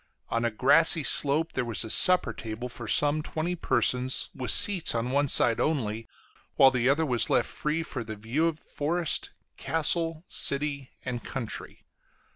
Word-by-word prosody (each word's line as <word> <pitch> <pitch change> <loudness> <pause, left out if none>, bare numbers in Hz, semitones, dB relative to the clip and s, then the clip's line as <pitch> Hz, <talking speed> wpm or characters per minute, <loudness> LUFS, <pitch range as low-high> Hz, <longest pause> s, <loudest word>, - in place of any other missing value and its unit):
On 115 0 -2
a 120 - +1
grassy 145 +8 +2
slope 150 +4 +1
there 130 - -2
was 115 -2 -2
a 110 - -8
supper 180 -10 +4
table 115 +3 -7
for 120 -1 -9
some 145 +6 +2
twenty 160 +3 -4
persons, 125 -4 +1
with 125 -3 -6
seats 180 - +5
on 115 +2 -2
one 140 +1 +1
side 115 -3 +4
only, 115 -8 -2 0.5
while 135 -1 +5
the 125 0 0
other 155 +4 +1
was 125 -6 -1
left - - +1
free 155 +2 -3
for 130 -7 -7
the 110 -1 -8
view 115 +10 -2
of 165 -2 -3
forest, 160 +2 -2 0.3
castle, 165 +3 -1
city, 140 -1 0 0.2
and 125 -2 -5
country. 125 -5 -7
135 Hz, 165 wpm, -26 LUFS, 120-155 Hz, 0.5 s, seats